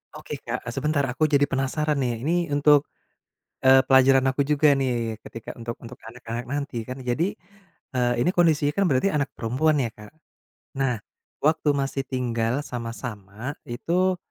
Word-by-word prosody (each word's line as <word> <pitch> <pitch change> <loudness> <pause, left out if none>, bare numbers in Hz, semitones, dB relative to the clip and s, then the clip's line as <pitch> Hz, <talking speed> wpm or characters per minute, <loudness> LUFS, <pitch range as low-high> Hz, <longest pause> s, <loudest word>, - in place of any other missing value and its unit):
Oke - - -7
Kak, - - -5
sebentar, 145 +3 0
aku 155 +5 +1
jadi 145 -1 +3
penasaran 140 +2 0
nih. 120 -2 -2
Ini 160 - +1 0.2
untuk, 145 0 +5 0.8
eee, 130 0 +8
pelajaran 135 0 +6
aku 140 +1 0
juga 150 0 +3
nih, 120 -4 -1
ketika 115 -1 -9
untuk 115 0 -5
untuk 120 +1 -10
anak-anak 120 0 -6
nanti 140 -1 -4
kan, 130 +1 -7
jadi, 150 +10 0 0.6
e - - -1 0.2
ini 180 - +3
kondisinya 155 -4 +3
kan 200 - +4
berarti 130 +8 +3
anak 145 -2 0
perempuan 135 +7 +1
ya 115 - -2
Kak? 105 +4 -13 0.7
Nah, 125 -3 +1 0.5
waktu 155 -1 +3
masih 135 0 -1
tinggal 120 -3 -1
sama-sama, 115 -1 -6 0.2
itu, 180 +9 0
135 Hz, 150 wpm, -25 LUFS, 120-150 Hz, 0.8 s, eee